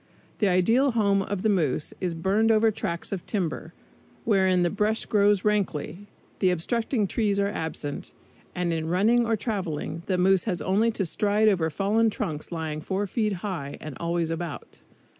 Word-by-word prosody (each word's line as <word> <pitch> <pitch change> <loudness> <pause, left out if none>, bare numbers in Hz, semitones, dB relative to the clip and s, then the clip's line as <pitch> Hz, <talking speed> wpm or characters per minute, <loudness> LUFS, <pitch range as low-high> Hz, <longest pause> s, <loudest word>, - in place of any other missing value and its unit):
The 210 - +3
ideal 225 +9 +3
home 200 -3 +2
of 195 -1 -3
the - - +3
moose 155 -7 0
is 180 -3 -1
burned 195 +7 +2
over 220 0 +4
tracts 170 -4 -4
of 195 -3 -3
timber, 170 -5 -3 0.5
wherein 190 -4 +3
the 175 - +1
brush 210 +2 0
grows 205 -1 +3
rankly, 200 -3 -1 0.3
the 185 - +3
obstructing 220 - 0
trees 200 0 0
are 200 - +2
absent, 160 -6 -4 0.4
and 175 -1 0
in 160 -1 -2
running 225 +7 +3
or 225 - +2
traveling 175 -8 -3
the 185 - +1
moose 190 +1 +3
has 185 -6 -1
only 210 +5 +2
to 215 -4 -1
stride 210 +5 +2
over 170 -5 +1
fallen 210 +8 +2
trunks 165 -9 -4
lying 160 -2 -4
four 195 +5 -2
feet 215 +2 -1
high, 145 -8 -4
and 155 -3 -8
always 170 -1 -1
about. 165 -2 -6
195 Hz, 170 wpm, -26 LUFS, 170-210 Hz, 0.5 s, over